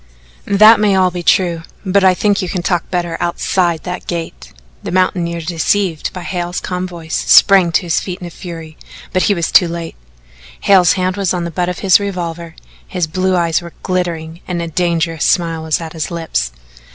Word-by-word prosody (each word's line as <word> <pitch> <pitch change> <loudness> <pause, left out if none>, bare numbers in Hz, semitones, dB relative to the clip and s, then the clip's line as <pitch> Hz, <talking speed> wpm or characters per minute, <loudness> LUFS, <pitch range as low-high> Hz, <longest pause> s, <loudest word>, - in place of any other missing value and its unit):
"That 215 +3 +7
may 205 -2 +3
all 185 -1 +3
be 175 0 -5
true, 175 -1 +2 0.2
but 195 +1 +2
I 185 -1 +5
think 205 +1 +1
you 185 - -3
can 180 -1 -3
talk 175 -2 -1
better 175 -2 -2
outside 175 -1 0
that 180 0 -6
gate." 170 -2 -6 0.3
The - - -6
mountaineer, 175 -2 0
deceived 170 +1 -1
by 180 - -8
Hale's 175 -1 -3
calm 180 0 -4
voice, 170 -2 -6
sprang 190 -4 +6
to 160 - +2
his 170 -2 0
feet 180 -2 -6
in 180 - -8
a 175 - -8
fury, 165 -3 -9 0.3
but 185 - +2
he 205 - +3
was 170 -2 -2
too 180 - +6
late. 170 -1 -6 0.7
Hale's 185 -4 +5
hand 185 0 -1
was 190 -2 0
on 175 - -2
the 170 - -4
butt 175 +2 -1
of 180 - -5
his 190 - +6
revolver, 170 -4 -5 0.3
his 180 -3 -1
blue 185 +3 0
eyes 170 -1 +1
were 170 -1 -10
glittering 170 -3 -3
and 180 -2 -3
a 170 - -3
dangerous 165 -1 -1
smile 165 -2 +1
was 160 -1 -1
at 165 -2 -7
his 160 - -4
lips. 160 - -2
175 Hz, 200 wpm, -16 LUFS, 165-185 Hz, 0.7 s, That